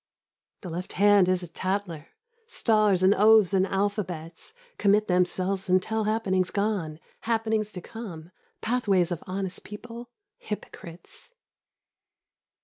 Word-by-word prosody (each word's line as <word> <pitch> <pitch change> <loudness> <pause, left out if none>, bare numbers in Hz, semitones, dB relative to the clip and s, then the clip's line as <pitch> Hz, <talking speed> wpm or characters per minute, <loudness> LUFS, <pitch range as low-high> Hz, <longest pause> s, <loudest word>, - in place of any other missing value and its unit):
The 180 - -7
left 180 +3 -5
hand 200 -2 +5
is 185 -1 +1
a - - -6
tattler; 180 -2 -4 0.4
stars 215 - +2
and 190 +2 +6
oaths 210 -1 +5
and 190 0 +3
alphabets 190 - -3 0.2
Commit 210 +1 +3
themselves 185 +1 0
and 185 +1 +5
tell 220 +3 -2
happenings 195 -4 0
gone, 200 -7 -2 0.2
happenings 220 -2 -1
to 180 - -7
come, 175 -7 -9 0.3
pathways 200 -7 +1
of 170 - -4
honest 185 0 -4
people, 235 +3 -9 0.3
hypocrites. 205 - -9
195 Hz, 120 wpm, -26 LUFS, 180-215 Hz, 0.4 s, and